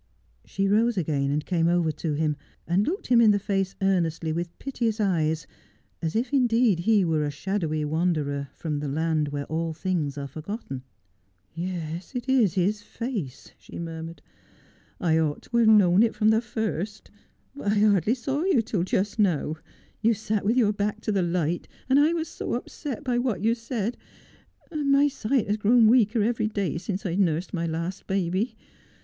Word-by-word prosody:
She 195 0 -1
rose 220 +3 +2
again 145 -5 0
and 150 +2 -1
came 165 -3 +1
over 170 -2 +2
to 155 +1 -3
him, 150 0 0 0.3
and 185 +4 +1
looked 375 +6 -2
him 240 -2 +5
in 225 - +6
the 205 - +5
fae.e 195 -2 0 0.2
earnestly, 165 -4 +1
with 170 +1 -4
piteous 235 -5 -2
eyes, 160 -6 +1 0.6
as 165 +1 -2
if 240 +4 -1
indeed 235 -7 +3
he 205 +1 +3
were 160 -2 +1
a 145 - -1
shadowy 155 -1 -2
wanderer 150 -3 -1
from 150 -3 -3
the 145 - -3
land 155 +1 0
where 145 0 -4
all 160 +2 -2
things 155 -5 -2
are 140 - -4
forgotten. 155 - -6 0.4
' - - -42 0.3
Yes, 170 - -5
it 245 +1 -3
is 240 -9 +3
his 200 +3 +1
face,' 205 - -5
she - - -11
murmured. 165 0 -7 0.4
' - - -30 0.3
I 160 -2 +2
ought 150 -2 -1
to 235 - -2
have 230 -2 +5
known 200 -3 +6
it 230 -1 +2
from 215 0 +3
the 220 +1 +4
first. 215 -3 -4 0.4
But 205 -7 -1
I - - +1
hardly 205 0 +3
saw 270 +4 -2
you 355 -12 +3
till 210 -4 -1
just 190 +4 -1
now. 160 -6 +1 0.4
You 225 +1 +3
sat 215 0 -2
with 225 +5 +1
your 215 -4 +4
hark 210 +1 -1
to 215 - -1
the 195 -2 +1
light, 175 -1 -1 0.2
and 265 +2 +4
I 305 +3 +4
was 330 -1 -2
so - - -4
upset 290 -2 -5
by 245 -3 0
what 235 -7 -1
you 225 +1 +4
said 230 -1 -3 0.4
— - - -33
and 295 -3 0
my 280 +1 +5
sight 260 -3 0
has 205 +1 0
grown 225 +2 +5
weaker 220 -1 +4
every 225 -1 +1
day 200 -5 -2
since 195 +1 -4
I've 180 +1 -1
nursed 170 -2 0
my 170 -2 -1
last 165 +3 -4
baby. 190 +4 -1
195 Hz, 190 wpm, -26 LUFS, 165-225 Hz, 0.6 s, in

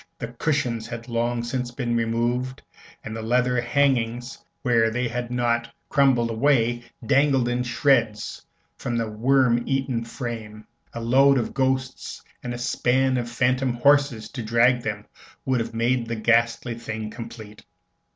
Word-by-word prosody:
The - - -5
cushions 125 -7 -1
had 120 0 -7
long 120 0 -1
since 125 +1 -3
been 120 -1 -2
removed, 120 +3 -1 0.4
and 110 - -6
the 115 - -5
leather 125 +2 +1
hangings, 120 -2 0 0.2
where 115 -3 +3
they 125 +2 -1
had 120 +1 -4
not 120 -1 0 0.2
crumbled 130 -5 +3
away, 120 -1 +2 0.2
dangled 135 0 +3
in 120 0 0
shreds 120 -3 +1 0.4
from 120 -1 -2
the 115 -1 -1
worm 120 +2 +2
eaten 135 -4 -1
frame. 115 -3 -7 0.3
A - - -3
load 135 +4 +4
of 120 - -2
ghosts 130 -1 -2 0.2
and 125 - -5
a 120 - -4
span 130 +2 +1
of 120 -1 -3
phantom 125 +1 +1
horses 140 -3 +3
to 125 - -6
drag 120 +2 +3
them 105 -2 -4 0.4
would 130 -2 +1
have 115 0 -4
made 120 +1 +1
the 115 - -2
ghastly 115 +1 +1
thing 110 -2 -6
complete. 115 -3 -10
120 Hz, 150 wpm, -24 LUFS, 115-130 Hz, 0.4 s, load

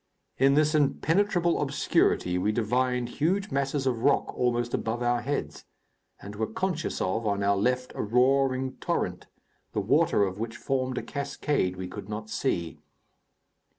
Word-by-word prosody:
In 135 +1 +5
this 150 +1 +3
impenetrable 170 +4 +2
obscurity 135 -9 +1
we 105 +4 +1
divined 125 +2 0
huge 190 - -1
masses 140 0 -1
of 125 -3 0
rock 140 +2 +2
almost 120 -1 0
above 115 +2 -1
our 120 0 +1
heads, 140 +4 -3 0.6
and 100 +1 -9
were 110 +1 -1
conscious 170 +6 -2
of, 110 +4 -1
on 100 -1 0
our 100 0 +3
left, 125 +5 0
a - - -3
roaring 130 +3 +2
torrent, - - -2 0.5
the - - 0
water 100 - +3
of 95 0 -2
which 115 +1 -4
formed 130 -1 -1
a - - -2
cascade 140 -8 -1
we 95 0 -5
could 95 +2 -8
not 110 0 -6
see. 85 - -2
125 Hz, 150 wpm, -27 LUFS, 110-140 Hz, 0.6 s, In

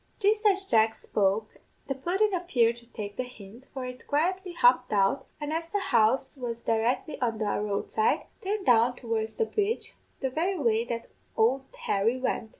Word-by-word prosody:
"Jist 425 +1 +2
as 390 -1 +3
Jack 225 - +3
spoke 205 +2 -1 0.3
the 275 - 0
pudden 375 +10 0
appeared 250 -11 +2
to 235 0 -15
take 205 -3 -7
the 255 - 0
hint, 240 0 -13
for 260 -2 -5
it 250 0 -9
quietly 360 +5 0
hopped 250 -4 +4
out, 205 +6 +2
and 295 0 -3
as 330 +1 -2
the 410 - -1
house 265 - +2
was 235 -3 -4
directly 235 +6 -1
on 230 -3 0
the 215 - -1
road 205 0 -2
side, 440 +1 +1 0.2
turned 400 +1 -2
down 240 0 +4
towards 225 -2 -3
the 455 - +1
bridge, 435 +1 -1 0.3
the 265 -2 -2
very 355 +7 0
way 230 -6 +2
that 235 -1 -4 0.3
ould 260 +5 +3 0.2
Harry 220 - +2
went. 240 -3 -2
250 Hz, 180 wpm, -28 LUFS, 225-340 Hz, 0.3 s, hopped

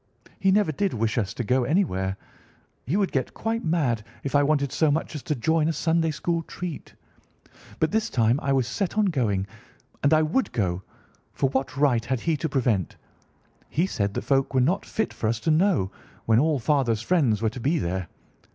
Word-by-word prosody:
He 195 - +3
never 200 -4 +3
did 190 +3 -1
wish 115 0 0
us 100 -3 -2
to 120 - -2
go 125 +3 +2
anywhere. 100 - 0 0.7
He 165 +9 +1
would 200 -2 +1
get 130 -2 -2
quite 225 +1 -2
mad 145 -10 0 0.2
if 140 - -4
I 145 - +5
wanted 140 -2 +1
so 155 - +2
much 155 +2 -1
as 150 - -5
to 150 - -2
join 155 +5 +1
a 165 - +1
Sunday 165 +1 +1
school 165 +2 -1
treat. 170 -1 -7 0.8
But 160 - +1
this 220 +1 0
time 120 +2 +2
I 140 - 0
was 135 -2 +2
set 195 - -2
on 215 - +4
going, 115 - 0 0.6
and 140 - +3
I 155 0 +5
would 175 +13 0
go; 95 -5 -1 0.5
for 135 - 0
what 135 0 -2
right 135 -5 +3
had 120 0 -2
he 165 -2 +1
to 155 +3 -2
prevent? 120 - 0 0.7
He 165 +5 +1
said 100 - -2
the - - -2
folk 135 -1 +1
were - - +5
not 160 +10 +1
fit 220 - -2
for 110 - -2
us 115 0 -1
to 160 - +1
know, 160 - +2 0.3
when 110 0 +4
all 155 +1 +2
father's 120 -3 +1
friends 135 - +2
were 110 - +3
to 125 - -8
be 145 +8 +1
there. 90 - -2
140 Hz, 205 wpm, -25 LUFS, 115-165 Hz, 0.8 s, I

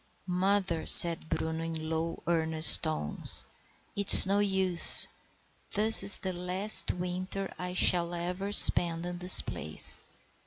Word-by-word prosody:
"Mother," 185 -1 -6
said 170 -2 +8
Bruno, 160 0 -9
in 160 -1 -11
low, 160 +1 -10
earnest 160 -1 -2
tones, 75 - -7 0.5
"it's 200 -2 +7
no 200 +2 -5
use. 190 -3 -1 0.7
This 215 +2 +3
is 200 - +5
the 190 -2 -10
last 180 +4 -3
winter 185 +2 -11
I 180 0 -11
shall 175 -1 -3
ever 180 +3 -10
spend 170 -4 +2
in 175 0 -12
this 180 +1 +2
place. 75 +2 -3
180 Hz, 125 wpm, -23 LUFS, 165-190 Hz, 0.7 s, said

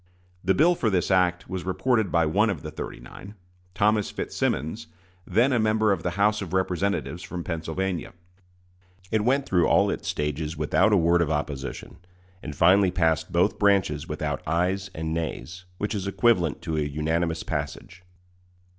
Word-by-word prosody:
The 95 +1 +2
bill 170 +4 +5
for 120 -9 0
this 95 -1 0
act 90 -2 +2
was 95 -1 -4
reported 100 +3 0
by 85 -1 +3
one 105 +8 +2
of 85 -9 -3
the - - -6
"thirty - - -7
nine" 100 +2 -12 0.4
Thomas 105 0 +2
Fitzsimmons, 80 - -2 0.4
then 120 +8 +3
a 120 - +2
member 110 -1 +2
of 95 -4 0
the 90 +2 -3
House 105 +1 +2
of 95 -2 -6
Representatives 95 -1 -1
from 90 -2 -6
Pennsylvania. 85 +2 -3 1.0
It 110 -1 +1
went 135 +4 +2
through 90 -7 +2
all - - +3
its - - -5
stages 75 +1 -2
without 90 +7 +2
a 105 - +5
word 85 0 +3
of 80 - +1
opposition, 75 -3 -4 0.4
and 75 -3 -7
finally 95 +4 +5
passed 80 -3 0
both - - +1
branches 95 -8 +2
without - - -3
ayes 90 +5 0
and 80 0 -3
nays, 85 +2 -5
which 105 +3 -2
is 100 -2 -3
equivalent 95 -7 +1
to 80 -3 -2
a - - +1
unanimous 80 +3 -1
passage. 75 +4 -5
90 Hz, 165 wpm, -25 LUFS, 80-100 Hz, 1.0 s, bill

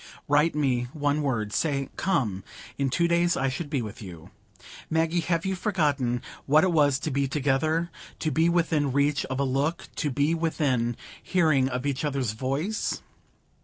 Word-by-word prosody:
Write 150 +2 +3
me 130 -5 +1
one 145 0 0
word; 115 -7 -1
say 140 -4 0
'Come!' 110 - 0 0.3
In 140 -1 0
two 170 +6 +2
days 170 0 +2
I 135 0 +1
should 145 +4 -4
be 140 -5 -1
with 105 0 -8
you. 90 -2 -10 0.6
Maggie, 165 +2 +1
have 170 0 0
you 190 - 0
forgotten 145 - 0 0.2
what 150 +3 +5
it 185 - +3
was 145 -4 +4
to 155 - -4
be 140 +1 +1
together,—to 155 +4 -1
be 160 +5 +3
within 165 -5 +1
reach 140 0 +2
of 130 0 -4
a - - +2
look, 140 +5 -1
to 150 - 0
be 145 +4 +1
within 140 -8 0 0.2
hearing 155 -8 +2
of 125 +1 -3
each 140 -1 -1
other's 135 -6 -1
voice?" 135 - -2
145 Hz, 165 wpm, -26 LUFS, 130-160 Hz, 0.6 s, what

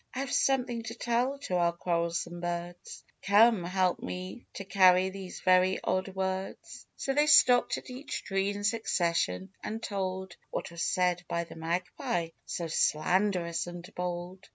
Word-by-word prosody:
I - - -2
have 275 - -3
something 250 -3 +1
to 225 +1 -7
tell 245 +4 0
to 185 -9 -1
our 170 -1 +2
quarrelsome 170 0 -2
birds; 175 0 -5 0.2
Come, 210 0 +5
help 185 0 +1
me 185 +6 -7
to 195 - -6
carry 185 -1 +5
these 190 -1 -8
very 185 0 +4
odd 185 +1 0
words." 190 0 -4
So 270 - -1
they 295 +2 +3
stopped 250 -5 +6
at - - -9
each 265 +4 -5
tree 195 0 0
in 205 0 -4
succession, 170 - 0
and 220 +1 -4
told 190 -3 -4
What 190 - -4
was 170 0 -6
said 180 -1 +1
by 170 0 -1
the 170 - -12
Magpie, 170 0 -2 0.2
so 170 - -3
slanderous 170 +2 +1
and 175 0 -8
bold. 180 +1 -5
185 Hz, 155 wpm, -30 LUFS, 175-205 Hz, 0.2 s, stopped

